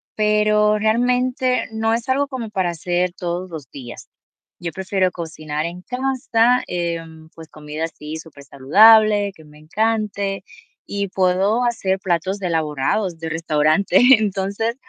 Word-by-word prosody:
pero 210 0 +2
realmente, 250 +3 +1
no 225 0 0
es 235 +3 -3
algo 280 +2 +1
como 250 -5 -6
para 185 -4 -1
hacer 175 +1 -1
todos 180 0 -4
los 155 -6 -9
días. 125 -4 -10 0.5
Yo 170 -1 -4
prefiero 190 0 0
cocinar 155 -3 -5
en 175 +2 -7
casa, 250 -1 +1
em, 165 -2 -5
pues, 160 -1 -12
comida, 155 +1 -6
así 155 -1 -8
súper 155 -3 -12
saludable, 205 +9 +5
que 160 -4 -17
me 150 0 -17
encante. 200 +2 -2 0.4
Y 200 0 -3
puedo 190 +5 +1
hacer 200 -6 0
platos 190 +2 -2
elaborados, 165 +2 -1
de 165 - -5
restaurante. 160 +3 +2 0.2
Entonces, 200 +3 -2
190 Hz, 135 wpm, -20 LUFS, 160-220 Hz, 0.5 s, saludable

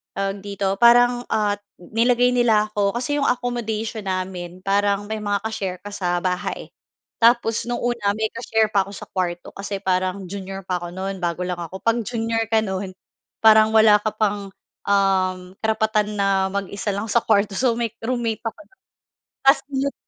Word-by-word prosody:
tawag 195 0 -2
dito, 200 -1 -1
parang, 245 +1 +5
ah, 205 -1 +1 0.2
nilagay 240 +5 +2
nila 220 -3 +3
ako. 205 -1 0
Kasi 275 +4 -1
yung 285 - +1
accommodation 225 -3 -2
namin 185 -1 -4
parang 200 +1 +1
may 220 - -2
mga 205 -1 0
ka-share 195 -5 -3
ka 205 - -7
sa 175 -3 -1
bahay. 180 -1 -2 0.5
Tapos 230 -1 +3
nung 240 0 -2
una 235 -4 0
may 220 0 0
ka-share 220 -2 0
pa 195 -1 +3
ako 200 - -10
sa - - -8
kuwarto 175 -2 -2
kasi 200 0 -4
parang 185 +1 0
junior 195 0 -6
pa 180 - 0
ako 175 0 -6
nun, 190 +1 -4
bago 170 +1 -1
lang 180 -1 -3
ako. 175 +3 -7
'Pag 230 0 +1
junior 225 -1 -1
ka 220 -1 +4
nun 190 -1 -3 0.5
parang 220 0 +7
wala 215 -1 +7
ka 215 0 -1
pang, 205 -2 0 0.4
um, 190 -2 +2 0.2
karapatan 220 -1 0
na 195 -1 +2
mag-isa 200 +1 -3
lang 205 +3 -3
sa 235 - +4
kuwarto. 205 -1 +2
So, 250 -3 +2
may 235 -2 -1
roommate 235 -2 -1
ako 225 -1 -3
nun, 385 - -32 0.6
tapos 270 +2 +6
yun 275 +1 -1
205 Hz, 175 wpm, -22 LUFS, 195-225 Hz, 0.6 s, parang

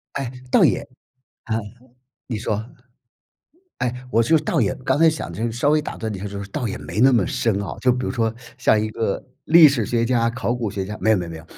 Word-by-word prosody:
哎， 135 -3 -3 0.2
倒 - - +5
也 - - +3 0.6
啊， 110 -2 -1 0.7
你 115 -4 -3
说。 110 0 -2 1.1
哎， 125 +1 -3
我 115 +1 +3
就 160 +7 +4
倒 155 -2 0
也 100 - +1
刚 130 - -1
才 165 0 +6
想 155 - -5
这 110 - -4
个 120 - 0
稍 120 +5 +1
微 155 0 +3
打 - - -7
断 110 -1 -4
一 - - -6
下， 95 - -8
就 100 0 -5
是 100 - -9
倒 135 +1 -3
也 - - -4
没 105 - -4
那 130 +1 +7
么 110 -7 +2
深 105 -4 0
啊。 100 - -5
就 125 - +4
比 125 +1 -2
如 - - -1
说 115 -2 0 0.2
像 110 -4 +3
一 110 - -1
个 110 -3 -2 0.2
历 165 -1 +8
史 125 -7 0
学 115 +1 0
家 115 -1 +2
考 120 0 -2
古 115 -4 -3
学 95 -2 -3
家， 105 +2 -6
没 110 - +3
有 105 - +4
没 90 - -3
有 85 - -8
没 - - -7
有。 80 - -12
115 Hz, 270 characters per minute, -22 LUFS, 105-130 Hz, 1.1 s, 历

